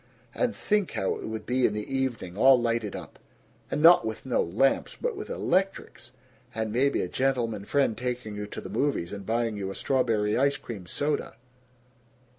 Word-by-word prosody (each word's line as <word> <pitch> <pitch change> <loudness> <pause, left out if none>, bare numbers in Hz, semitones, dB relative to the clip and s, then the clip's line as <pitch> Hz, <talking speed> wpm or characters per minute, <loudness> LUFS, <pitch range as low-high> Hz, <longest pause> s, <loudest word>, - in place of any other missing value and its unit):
And 250 -2 0
think 210 -3 0
how 95 - 0
it - - -7
would 110 -1 -5
be 125 +1 +2
in - - -3
the 105 +6 -4
evening, 120 -9 -2
all 130 +4 +6
lighted 115 -3 -1
up - - -9 0.5
and 150 - -1
not 170 -3 +8
with 110 +2 -5
no 130 - +1
lamps, 115 +11 +1
but 485 -2 -1
with 410 - -7
electrics! 195 - -1 0.4
And 110 -1 -2
maybe 140 +4 +2
a - - -2
gentleman 115 -3 -1
friend 135 -2 +1
taking 125 -2 -4
you 105 0 -5
to - - -7
the - - -8
movies 135 -11 -1
and 100 -1 -7
buying 115 -1 0
you 95 -1 -3
a 95 - -6
strawberry 110 -6 +1
ice 140 +2 +2
cream 105 -9 -8
soda! 145 - -2
120 Hz, 185 wpm, -27 LUFS, 105-135 Hz, 0.5 s, not